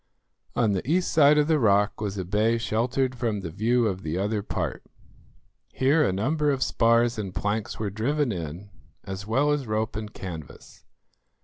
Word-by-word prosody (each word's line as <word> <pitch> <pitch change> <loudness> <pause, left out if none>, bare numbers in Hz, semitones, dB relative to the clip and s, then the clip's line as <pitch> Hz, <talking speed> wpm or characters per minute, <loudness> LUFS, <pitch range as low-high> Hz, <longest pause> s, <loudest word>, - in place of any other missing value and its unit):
On 115 -4 +2
the 100 +6 -2
east 180 +3 +1
side 150 -1 +6
of 150 0 +3
the 160 -2 +3
rock 105 -2 +2
was 100 -2 -3
a 95 - -3
bay 105 +5 +1
sheltered 125 +3 0
from 115 -5 -2
the 85 -3 -6
view 115 +6 +1
of 95 -3 -1
the 80 0 -3
other 105 +2 -1
part. 100 - -4 0.9
Here 145 +4 +3
a - - +2
number 145 +10 0
of 135 -2 +1
spars 115 0 +2
and 95 -3 -5
planks 105 +1 -2
were 105 -2 -3
driven 130 +6 0
in, 85 +2 -6 0.3
as 95 +1 -7
well 135 +7 +2
as 145 -4 -1
rope 110 +1 -1
and 105 0 -5
canvas. 85 -9 -9
110 Hz, 180 wpm, -26 LUFS, 100-130 Hz, 0.9 s, side